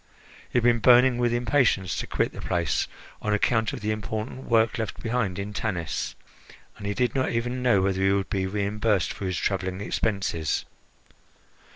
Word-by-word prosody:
He -, -, -1 dB
had 120 Hz, -, +3 dB
been 120 Hz, -1 st, +4 dB
burning 125 Hz, +1 st, +6 dB
with 120 Hz, -1 st, +2 dB
impatience 120 Hz, -, +2 dB
to -, -, -3 dB
quit -, -, 0 dB
the -, -, -8 dB
place, 85 Hz, -5 st, 0 dB, 0.3 s
on 105 Hz, 0 st, +1 dB
account 115 Hz, +1 st, +1 dB
of 135 Hz, -, -6 dB
the 105 Hz, +1 st, -1 dB
important 110 Hz, +4 st, -4 dB
work 115 Hz, 0 st, +2 dB
left 110 Hz, -3 st, -4 dB
behind 115 Hz, -6 st, -1 dB
in 100 Hz, +1 st, -4 dB
Tanis, 90 Hz, -6 st, -3 dB, 0.6 s
and 100 Hz, -, -5 dB
he 100 Hz, -, -1 dB
did 125 Hz, 0 st, +1 dB
not 130 Hz, -1 st, +1 dB
even 120 Hz, +2 st, -2 dB
know 120 Hz, -7 st, +3 dB
whether 95 Hz, -1 st, 0 dB
he 95 Hz, 0 st, +4 dB
would 100 Hz, -1 st, 0 dB
be 95 Hz, -1 st, 0 dB
reimbursed 105 Hz, 0 st, 0 dB
for 100 Hz, -, -6 dB
his 90 Hz, -2 st, -1 dB
travelling 95 Hz, -1 st, -1 dB
expenses. 100 Hz, -7 st, -1 dB
105 Hz, 180 wpm, -26 LUFS, 95-120 Hz, 0.6 s, burning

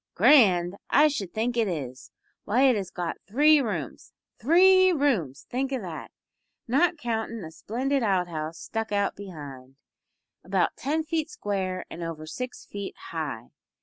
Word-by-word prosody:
"Grand! 195 Hz, -, +5 dB
I 305 Hz, +1 st, +5 dB
should 200 Hz, -, -4 dB
think 235 Hz, +4 st, -1 dB
it 230 Hz, -2 st, +2 dB
is. 135 Hz, -8 st, -5 dB, 0.3 s
Why, 245 Hz, +6 st, +2 dB
it 260 Hz, -3 st, +5 dB
has 195 Hz, -3 st, -3 dB
got 175 Hz, -2 st, -4 dB
three 295 Hz, +7 st, +5 dB
rooms 180 Hz, -, -5 dB, 0.3 s
three 370 Hz, -, +6 dB
rooms 190 Hz, -, 0 dB
think 265 Hz, +2 st, -2 dB
o' 265 Hz, -, -1 dB
that! 175 Hz, -7 st, -7 dB, 0.6 s
Not 330 Hz, +8 st, +2 dB
countin' 230 Hz, -4 st, -3 dB
a 160 Hz, -, -8 dB
splendid 260 Hz, -, -2 dB
out 190 Hz, -5 st, +1 dB
house 160 Hz, -1 st, -5 dB
stuck 225 Hz, -1 st, -4 dB
on 200 Hz, -1 st, +1 dB
behind, 140 Hz, -9 st, -10 dB, 0.7 s
about -, -, 0 dB
ten 305 Hz, +4 st, -1 dB
feet 320 Hz, -1 st, -2 dB
square 190 Hz, -3 st, -3 dB
and 170 Hz, -, -7 dB
over 165 Hz, -2 st, -5 dB
six 250 Hz, +10 st, -6 dB
feet 200 Hz, -1 st, -7 dB, 0.2 s
high. 145 Hz, -8 st, -5 dB
205 Hz, 150 wpm, -26 LUFS, 170-270 Hz, 0.7 s, three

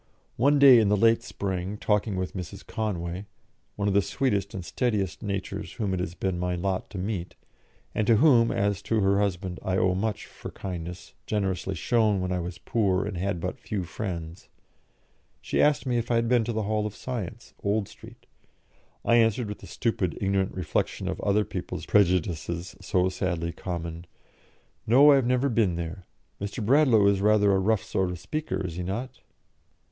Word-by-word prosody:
One 140 Hz, +5 st, +4 dB
day 135 Hz, -4 st, +9 dB
in 105 Hz, -3 st, +3 dB
the 105 Hz, -, +3 dB
late 115 Hz, +3 st, +4 dB
spring, 95 Hz, -2 st, -4 dB
talking 105 Hz, -1 st, 0 dB
with 95 Hz, 0 st, -3 dB
Mrs. 90 Hz, -4 st, -7 dB
Conway 95 Hz, -3 st, -3 dB, 0.5 s
one 100 Hz, 0 st, -1 dB
of 100 Hz, -, +2 dB
the 100 Hz, -, +5 dB
sweetest 100 Hz, -3 st, -1 dB
and 95 Hz, -3 st, -5 dB
steadiest 105 Hz, -8 st, -1 dB
natures 100 Hz, -1 st, -4 dB
whom 100 Hz, -4 st, -2 dB
it 95 Hz, -, -1 dB
has 90 Hz, -1 st, -3 dB
been 95 Hz, -2 st, -2 dB
my 90 Hz, 0 st, -1 dB
lot 95 Hz, +1 st, -2 dB
to 100 Hz, -, -8 dB
meet, 95 Hz, -2 st, -3 dB, 0.6 s
and 110 Hz, -, 0 dB
to 115 Hz, -, +6 dB
whom, 120 Hz, -2 st, +5 dB
as 100 Hz, -2 st, 0 dB
to 110 Hz, -2 st, 0 dB
her 100 Hz, 0 st, +3 dB
husband, 95 Hz, -2 st, -2 dB
I 95 Hz, 0 st, -1 dB
owe 95 Hz, -1 st, +3 dB
much 105 Hz, +2 st, -2 dB
for -, -, -9 dB
kindness 90 Hz, -1 st, -7 dB
generously 95 Hz, -2 st, -1 dB
shown 110 Hz, +2 st, +2 dB
when 95 Hz, 0 st, -2 dB
I 90 Hz, -, 0 dB
was 85 Hz, +1 st, -5 dB
poor 95 Hz, -5 st, 0 dB
and 105 Hz, -1 st, -4 dB
had 90 Hz, 0 st, -2 dB
but 90 Hz, +9 st, -4 dB
few 105 Hz, -5 st, -3 dB
friends 85 Hz, -3 st, -6 dB, 0.9 s
she -, -, 0 dB
asked 150 Hz, -1 st, +3 dB
me 125 Hz, -2 st, +1 dB
if 115 Hz, -, -4 dB
I 120 Hz, -, +2 dB
had 115 Hz, 0 st, +2 dB
been 120 Hz, -1 st, +3 dB
to 120 Hz, -, -2 dB
the 110 Hz, -1 st, -1 dB
Hall 105 Hz, +1 st, 0 dB
of 105 Hz, -, -8 dB
Science, 115 Hz, -3 st, -6 dB
Old 100 Hz, 0 st, 0 dB
Street. -, -, -15 dB, 0.8 s
I 120 Hz, -, +5 dB
answered, 115 Hz, 0 st, +2 dB
with 105 Hz, -, -6 dB
the -, -, -11 dB
stupid, 105 Hz, -8 st, -1 dB
ignorant 95 Hz, -1 st, 0 dB
reflection 90 Hz, -, -2 dB
of -, -, -4 dB
other 105 Hz, +1 st, +2 dB
people's -, -, -5 dB
prejudices 85 Hz, -2 st, +1 dB
so 95 Hz, -1 st, +1 dB
sadly 85 Hz, -2 st, -2 dB
common, 85 Hz, -1 st, -6 dB, 0.8 s
"No, 135 Hz, +6 st, +7 dB
I -, -, +7 dB
have 130 Hz, -3 st, +1 dB
never 125 Hz, +2 st, +2 dB
been 110 Hz, -8 st, +2 dB
there. 85 Hz, +2 st, -6 dB, 0.3 s
Mr. 100 Hz, +2 st, -4 dB
Bradlaugh 125 Hz, -4 st, +5 dB
is 100 Hz, -1 st, +3 dB
rather 105 Hz, -1 st, +4 dB
a 95 Hz, -, +3 dB
rough 105 Hz, +1 st, +1 dB
sort 95 Hz, -1 st, -1 dB
of 90 Hz, -, -4 dB
speaker, 95 Hz, -, -3 dB
is 85 Hz, -2 st, -5 dB
he -, -, -2 dB
not?" 105 Hz, +9 st, -4 dB
100 Hz, 190 wpm, -27 LUFS, 90-110 Hz, 0.9 s, day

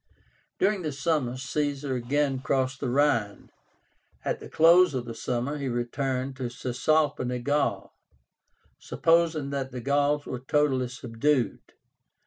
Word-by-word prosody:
During 200 Hz, 0 st, +1 dB
this 150 Hz, -4 st, -4 dB
summer 140 Hz, -6 st, 0 dB
Caesar 140 Hz, +1 st, -2 dB
again 135 Hz, +2 st, 0 dB
crossed 130 Hz, 0 st, -1 dB
the 135 Hz, -, -2 dB
Rhine. 120 Hz, -6 st, +1 dB, 0.7 s
At -, -, -1 dB
the -, -, -10 dB
close 170 Hz, -1 st, +5 dB
of 125 Hz, -2 st, -2 dB
the 115 Hz, -, -6 dB
summer 125 Hz, +5 st, -3 dB
he 140 Hz, -, -3 dB
returned 130 Hz, +2 st, -2 dB
to 125 Hz, -2 st, -3 dB
Cisalpine 125 Hz, 0 st, 0 dB
Gaul, 140 Hz, -9 st, 0 dB, 0.9 s
supposing 165 Hz, -4 st, +1 dB
that 135 Hz, -1 st, -2 dB
the 125 Hz, -, -6 dB
Gauls 145 Hz, +3 st, +1 dB
were 125 Hz, -, -5 dB
totally 130 Hz, -1 st, +1 dB
subdued. 125 Hz, +2 st, -1 dB
135 Hz, 125 wpm, -27 LUFS, 125-150 Hz, 0.9 s, close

